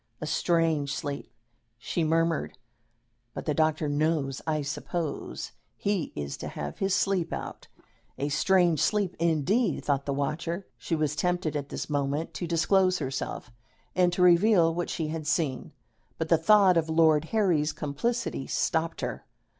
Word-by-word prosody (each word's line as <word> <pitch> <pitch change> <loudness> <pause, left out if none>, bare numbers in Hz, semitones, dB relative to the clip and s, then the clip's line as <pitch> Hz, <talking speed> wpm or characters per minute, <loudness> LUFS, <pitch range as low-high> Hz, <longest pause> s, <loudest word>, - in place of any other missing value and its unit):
"A - - -4
strange 165 -5 +1
sleep," 145 -1 -5 0.5
she 140 +8 -2
murmured; 165 -2 0 0.8
"but - - -5
the 150 - +1
doctor 155 0 +1
knows, 145 -2 0
I 155 -2 0
suppose. 155 +1 -4 0.3
He 200 -5 -1
is 70 -1 -4
to - - -6
have 75 -1 -6
his 195 0 +1
sleep 185 -4 0
out." - - -6 0.5
"A 145 - -1
strange 170 +2 +3
sleep, 205 -4 +1
indeed!" 170 - +1
thought 140 -1 0
the - - 0
watcher. 165 +6 -2
She 165 - -2
was 155 -2 0
tempted 180 -2 -1
at 145 -1 -3
this - - -4
moment 145 +2 -1
to 175 - -4
disclose 185 +3 +3
herself 135 -3 -4 0.4
and 180 -1 +4
to 180 - +2
reveal 175 -1 +5
what 175 +1 -3
she 160 -2 -2
had 155 -1 -4
seen; 150 -5 -1 0.5
but 160 -1 -3
the 165 - +5
thought 190 0 +5
of 160 -1 +1
Lord 160 -1 +4
Harry's 170 -7 +1
complicity 150 - -2
stopped 165 0 -1
her. - - -5
160 Hz, 155 wpm, -28 LUFS, 145-175 Hz, 0.8 s, reveal